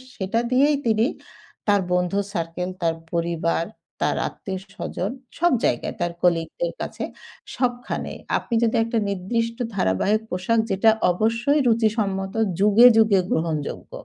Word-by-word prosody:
সেটা 195 +4 -1
দিয়েই 280 +3 +4
তিনি 220 0 +3 0.6
তার 205 -1 +4
বন্ধুর 180 +3 +1
সার্কেল, 170 +1 -3
তার 165 -1 +1 0.2
পরিবার, 170 -1 0 0.4
তার - - +1
আত্মীয় 190 -1 -6 0.2
স্বজন 200 0 -3 0.3
সব 345 +1 +4
জায়গায় - - -1
তার 175 0 0
colleague 165 -2 +1
দের - - 0
কাছে - - -4 0.5
সবখানেই। 245 -1 -2 0.2
আপনি 235 - -6
যদি 230 0 +2
একটা 230 0 -2
নির্দিষ্ট 230 +5 -2 0.2
ধারাবাহিক 195 - +1
পোশাক 190 +6 +1
যেটা 195 +4 +4 0.2
অবশ্যই 230 +9 +1
রুচি 225 -1 +4
সম্মত 195 -2 -1 0.3
যুগে, 210 +4 +7
যুগে 215 -3 +5
গ্রহণযোগ্য, 160 -3 -2
200 Hz, 130 wpm, -23 LUFS, 180-230 Hz, 0.6 s, যুগে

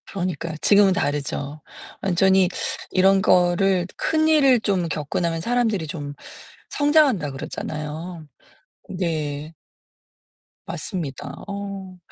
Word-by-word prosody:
그러니까요. 175 -4 -4
지금은 200 -2 +5
다르죠. 145 -1 -2 0.4
완전히 190 0 +3 0.4
이런 195 +1 +4
거를 180 0 +3
큰일을 310 -5 +4
좀 195 -5 0
겪고 150 -1 -3
나면 165 -2 -1
사람들이 225 -5 0
좀 145 -3 -6 0.6
성장한다고 290 - +3
그러잖아요. 155 +4 -6 0.6
네. 155 -4 -3 1.1
맞습니다. 160 - -5
어 200 -2 -6
180 Hz, 235 characters per minute, -23 LUFS, 155-200 Hz, 1.1 s, 지금은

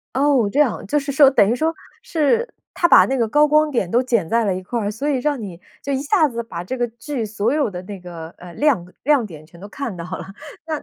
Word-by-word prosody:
哦， 270 -5 +3
这 290 - +2
样。 255 -8 +1
就 295 +9 +1
是 280 0 -4
说 280 -1 +6
等 205 -7 +4
于 - - +2
说 320 +5 0 0.3
是 450 - +1 0.3
他 - - -12
它 345 - +6
把 - - +8
那 270 - -1
个 230 -3 +1
高 295 +6 +4
光 305 +1 +3
点 235 -10 -1
都 240 +5 +3
剪 230 -9 0
在 230 +3 +2
了 195 -3 0
一 185 - -5
块 235 +6 -3
儿， 205 -1 -2
所 230 +8 -4
以 280 -3 +1
让 285 0 -1
你 185 -5 -8 0.2
就 280 - -3
一 270 - 0
下 315 +1 +3
子 235 -3 -4
把 175 -7 -7
这 260 +8 -4
个 245 - 0
剧 235 +2 -5
所 215 +2 -1
有 290 -6 +1
的 180 -2 -7
那 200 +1 -8
个， 170 -2 -9
呃， 180 -1 -11
亮 290 - +2
呃， 180 - -18
亮 285 -3 +3
点 155 -5 -12
全 170 +2 -17
都 200 - -9
看 240 -2 -5
到 170 - -6
了。 185 +2 -6 0.4
那， 310 -2 -3
240 Hz, 295 characters per minute, -20 LUFS, 200-290 Hz, 0.4 s, 把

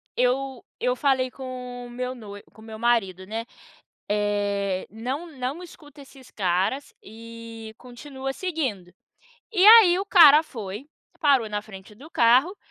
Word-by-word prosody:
eu 255 +1 -1 0.2
eu 250 +1 0
falei 260 -1 +1
com 250 -2 -8
o - - -13
meu 250 +1 -5
noivo, 205 -4 -11
com 220 - -18
o - - -14
meu 220 -1 -9
marido, 205 -6 0
né, 225 +3 -5 0.7
eh, 205 -2 -1
não 255 - -5
não 270 +8 -4
escuta 295 -4 -14
esses 265 -1 -17
caras 190 +8 -1
e 230 0 -11
continua 265 +2 -7
seguindo. 260 - -4 0.6
E 380 -2 +3
aí 425 -5 +8
o 390 - -4
cara 310 -6 +7
foi, 220 +1 -8 0.3
parou 275 -7 +3
na 210 0 -3
frente 195 -1 -13
do 290 +6 -13
carro, 260 - +3
245 Hz, 145 wpm, -24 LUFS, 215-275 Hz, 0.7 s, aí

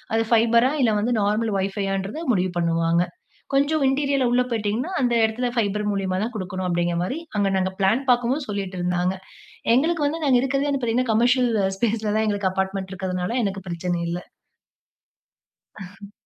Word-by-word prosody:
அது 225 - +2
ஃபைபரா! 235 +3 +4
இல்ல 225 - +3
வந்து 240 +3 0
நார்மல் 210 +1 0
வைஃபை 195 +1 -2
யான்றத 195 - -3
முடிவு 185 -1 0
பண்ணுவாங்க. 165 0 +2 0.5
கொஞ்சம் 285 +2 +2
இன்டீரியரிலா 275 -1 +1
உள்ள 250 +1 +3
போயிட்டீங்கன்னா 225 - -1
அந்த 245 -1 +2
இடத்துல 225 +3 0
ஃபைபர் 210 -2 0
மூலியமா 190 -2 -1
தான் 230 +3 -2
கொடுக்கணும் 185 -1 -4
அப்பிடிங்கிறமாரி 175 - -1 0.2
அங்க 200 -1 +2
நாங்க 190 0 0
பிளான் 205 +7 +3
பார்க்கும்போது 245 +4 +2
சொல்லிட்டு 195 -3 -4
இருந்தாங்க. 180 +1 0 0.6
எங்களுக்கு 310 +3 +1
வந்து 320 +2 -3
நாங்க 260 -3 +4
இருக்கிறதே 275 +2 0
வந்து 275 -2 -1
பார்த்தீங்கன்னா, 240 0 0
கமர்ஷியல் 245 +2 +3 0.3
ஸ்பேஸ் 225 0 0
ல - - +1
தான் 220 - +2
எங்களுக்கு 200 -2 0
அபார்ட்மெண்ட் 190 0 -2
இருக்கிறதுனால 185 +4 -2
எனக்கு 195 -1 -3
பிரச்சனை 175 0 -2
இல்ல. 175 - -2 1.6
அ. 200 +2 -11
210 Hz, 160 wpm, -23 LUFS, 190-245 Hz, 1.6 s, ஃபைபரா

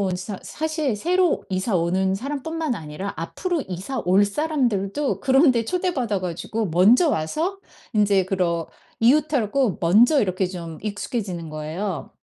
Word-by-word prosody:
온 185 -2 0
사 190 +1 -6
사실 310 -6 -2
새로 360 - +1
이사 185 +1 0
오는 190 +3 +1
사람뿐만 290 +4 -3
아니라 160 +3 -6
앞으로 335 - -2
이사 190 +9 -4
올 195 +3 +5
사람들도 255 -2 -1
그런 270 +1 +5
데 230 -1 0
초대받아 275 - -1
가지고 185 +5 -3
먼저 205 - +5
와서 320 - -1 0.3
인제 200 -3 +3
그런 175 -3 0 0.4
이웃하고 265 - +2
먼저 225 - +5
이렇게 185 -1 0
좀 170 -4 -7
익숙해지는 200 -5 -4
거예요. 155 +1 -4
205 Hz, 310 characters per minute, -23 LUFS, 185-280 Hz, 0.4 s, 올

